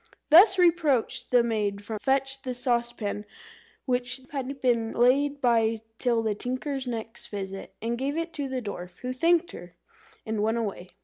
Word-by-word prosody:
Thus 380 +5 +8
reproached, 330 -9 +2
the 245 -1 +5
maid 205 -3 -1
fetched 270 +5 -1
the 255 -1 -3
saucepan, 240 -4 -1 0.6
which 250 0 -1
had 275 -1 -4
been 235 -3 +1
laid 280 +4 +3
by 230 -3 +2 0.2
till 235 -3 +1
the 220 -1 +1
tinker's 255 +4 -3
next 225 -1 -5
visit, 195 -1 -6
and 235 +1 -1
gave 280 +3 -1
it 330 0 -3
to 285 -3 -3
the 260 -1 -3
dwarf, 180 -4 -7
who 255 0 -3
thanked 335 +5 +2
her, 175 0 -10 0.5
and 220 -1 -2
went 220 +2 +1
away. 200 -5 -4
245 Hz, 160 wpm, -27 LUFS, 220-270 Hz, 0.6 s, Thus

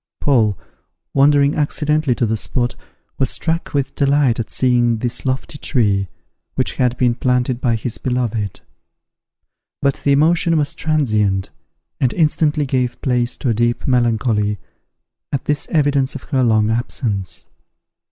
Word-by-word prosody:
Paul, 110 - +2 0.6
wandering 140 +1 +4
accidentally 150 -2 +1
to 120 - 0
the 110 0 0
spot, 120 +2 -1 0.5
was 135 -3 +2
struck 165 +1 -1
with 140 -3 -1
delight 140 -4 +2
at 115 - -3
seeing 120 -2 +2
this 125 +3 -3
lofty 135 +2 -3
tree, 100 -6 +1 0.5
which 130 - -1
had 125 -2 +1
been 125 -2 +2
planted 125 0 0
by 120 -2 +1
his 115 +1 -4
beloved; 120 -6 -2 1.2
but 140 -1 0
the 140 - +2
emotion 165 +3 +3
was 145 -1 0
transient, 110 -11 0 0.5
and 125 - +1
instantly 155 -2 +1
gave 130 -2 -1
place 125 -2 0
to 130 - -2
a - - +2
deep 120 +2 0
melancholy, 115 -4 +1 0.7
at 140 - -2
this 150 0 0
evidence 140 -4 +1
of - - -7
her 135 -4 0
long 110 -3 +3
absence. 115 -4 -3
125 Hz, 140 wpm, -19 LUFS, 115-145 Hz, 1.2 s, wandering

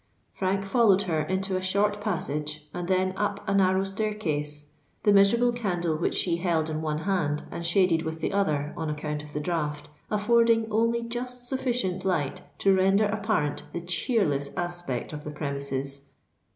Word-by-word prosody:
Frank 195 +1 -1
followed 200 -2 +4
her 165 -5 0
into 190 +4 -1
a 185 - 0
short 205 +2 +1
passage, 150 -6 -3
and 175 -1 -4
then 185 0 +2
up 205 0 -2
a 195 - +1
narrow 190 -1 +3
staircase, 160 -8 -2 0.3
the 205 - +5
miserable 235 +5 +5
candle 175 -8 -1
which 160 - -1
she 170 -2 +1
held 165 -3 0
in 155 0 -2
one 155 -1 -1
hand 160 -6 0
and 170 - -5
shaded 170 -1 +3
with 160 0 -4
the 165 - -2
other 150 -7 0
on 160 -3 -3
account 150 0 -3
of 150 - -12
the 150 - -2
draught, 150 -2 -2 0.2
affording 225 +2 +3
only 230 +2 +2
just 245 +1 -5
sufficient 245 -8 -1
light 165 -8 0 0.2
to 195 - +4
render 195 +2 +4
apparent 205 -7 0
the 170 - -3
cheerless 175 - 0
aspect 175 -8 -3
of 150 0 -6
the 150 - -5
premises. 140 -1 -4
185 Hz, 165 wpm, -27 LUFS, 150-205 Hz, 0.3 s, the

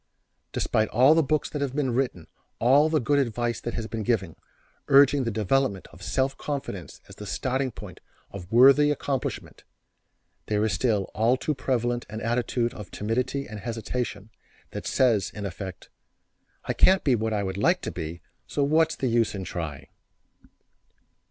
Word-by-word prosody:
Despite 110 0 0
all 130 +6 +5
the 165 - +4
books 155 +1 0
that 145 - -3
have 135 -2 -2
been 135 -5 0
written, 120 -10 -1 0.3
and 140 +6 +4
the 155 - +3
good 145 +3 +2
advice 120 -2 -1
that 120 - -4
has 115 - -3
been 110 0 -4
given, 100 -7 -1 0.5
urging 140 -1 +5
the - - 0
development 110 -1 0
of 90 - -15
self 135 +5 0
confidence 135 - -5
as - - -14
the - - -8
starting 130 +1 -1
point - - -11 0.3
for 100 -2 -7
worthy 135 +6 +6
accomplishment, 140 -2 -3 0.8
there 105 0 +1
is 110 - 0
still 110 -6 +1
all 115 +5 +2
too 150 - -1
prevalent 120 -3 -1
an 110 +1 -5
attitude 120 +1 -1
of 105 -3 -9
timidity 125 +6 -2
and 105 -1 -7
hesitation 115 -1 -4 0.4
that - - -6
says 115 -6 +2
in 105 -1 -5
effect: 95 0 -7 0.7
"I - - -1
can't 190 0 +4
be 135 - +3
what 110 -1 0
I 105 -2 0
would 95 0 -4
like 100 - +2
to - - -4
be, 80 0 -6 0.2
so 145 - -1
what's 155 +3 +3
the - - -3
use 115 -3 +1
of 95 - -4
trying." 80 -6 -5
120 Hz, 170 wpm, -26 LUFS, 105-135 Hz, 0.8 s, worthy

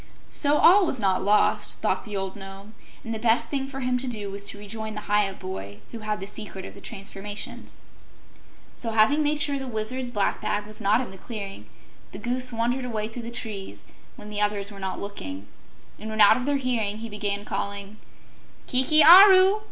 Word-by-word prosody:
So 290 0 +2
all 370 +3 +6
was 265 - -1
not 195 -4 +1
lost, 210 +1 +2
thought - - -1
the 210 -2 -4
old 195 0 -4
Nome, 195 +1 -11 0.3
and 225 - -5
the 220 - -4
best 225 +1 +2
thing 270 -2 -2
for 270 0 -7
him 250 0 0
to 260 - -4
do 210 -5 -4
was 200 0 -6
to 200 - -4
rejoin 215 +1 -6
the 210 - -5
Hyup 205 -2 +1
boy 100 - -7
who 230 - -7
had 215 -1 -3
the 195 - -5
secret 200 -2 -7
of - - -9
the 200 - -13
transformations. 200 +2 -7 1.0
So, 230 -2 -4
having 225 +8 +4
made 300 0 +1
sure 285 -2 +1
the 265 - -6
Wizard's 245 +2 -3
black 205 -4 -1
bag 205 0 -1
was 215 +1 -8
not 215 +4 +3
in 250 - -6
the 190 - -11
clearing, 200 -3 -7 0.5
the - - -6
Goose 250 +1 -1
wandered 240 +3 -1
away 220 -3 -3
through 240 +2 -7
the 235 - -7
trees 215 -5 -6 0.3
when 210 - -10
the 210 0 -2
others 205 -1 0
were 200 - -10
not 190 -1 -4
looking, 100 - -7 0.5
and 220 - -7
when 220 0 -5
out 205 -1 +8
of 255 +1 -3
their 285 -1 +2
hearing, 230 -6 -1
he 230 +1 -6
began 205 -1 -3
calling, 200 +1 -4 0.7
"Kiki 280 +5 +4
Aru! 380 +4 +9
215 Hz, 205 wpm, -25 LUFS, 200-250 Hz, 1.0 s, Aru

